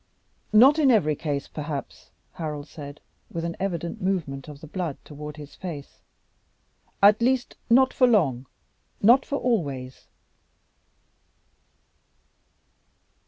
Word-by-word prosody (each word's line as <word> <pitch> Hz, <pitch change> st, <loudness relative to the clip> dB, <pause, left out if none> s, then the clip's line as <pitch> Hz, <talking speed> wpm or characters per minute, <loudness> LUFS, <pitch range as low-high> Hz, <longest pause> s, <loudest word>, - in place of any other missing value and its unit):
"Not 260 Hz, +8 st, +7 dB
in 285 Hz, -3 st, +5 dB
every 195 Hz, -11 st, +4 dB
case, 145 Hz, -2 st, -3 dB
perhaps," 150 Hz, -2 st, -6 dB, 0.2 s
Harold 150 Hz, -4 st, -5 dB
said, 145 Hz, -2 st, -10 dB, 0.3 s
with 165 Hz, 0 st, -4 dB
an 170 Hz, -, -3 dB
evident 170 Hz, -3 st, -3 dB
movement 165 Hz, -8 st, -2 dB
of 150 Hz, -2 st, -10 dB
the 155 Hz, -, -11 dB
blood 165 Hz, -2 st, -4 dB
toward 150 Hz, 0 st, -8 dB
his 145 Hz, -1 st, -10 dB
face; 160 Hz, -7 st, -8 dB, 1.0 s
"at 210 Hz, +2 st, +7 dB
least 255 Hz, +1 st, +1 dB
not 260 Hz, +3 st, +5 dB
for 255 Hz, -, +4 dB
long, 140 Hz, -, +2 dB, 0.5 s
not 240 Hz, +6 st, +5 dB
for 280 Hz, -, -1 dB
always." 140 Hz, -, -2 dB
165 Hz, 115 wpm, -25 LUFS, 145-215 Hz, 1.0 s, Not